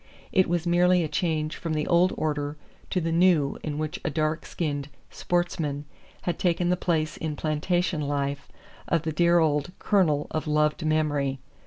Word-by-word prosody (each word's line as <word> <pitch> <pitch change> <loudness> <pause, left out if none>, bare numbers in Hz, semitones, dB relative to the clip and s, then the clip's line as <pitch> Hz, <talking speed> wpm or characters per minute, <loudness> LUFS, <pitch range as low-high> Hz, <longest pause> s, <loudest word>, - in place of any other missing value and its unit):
It 185 -3 +3
was 175 -1 0
merely 175 +1 +4
a - - -1
change 155 0 -1
from 165 -2 -3
the 150 - 0
old 175 +1 +4
order 150 -1 -2 0.3
to 185 - 0
the 165 -1 -1
new 165 -4 +3
in 150 -2 -4
which 155 0 -3
a - - 0
dark 155 0 -1
skinned 145 -4 -3 0.2
"sportsman" 160 -5 -1 0.4
had 175 -2 -2
taken 175 -1 +1
the 180 - +3
place 160 -3 -1
in 155 -2 -3
plantation 160 +2 0
life 140 -1 -2 0.4
of 165 -2 +1
the 160 - -1
dear 170 +2 +4
old 155 0 +1
"Colonel" 160 -8 +2
of 155 0 -2
loved 150 +2 +1
memory. 150 -3 +1
155 Hz, 170 wpm, -26 LUFS, 150-175 Hz, 0.4 s, merely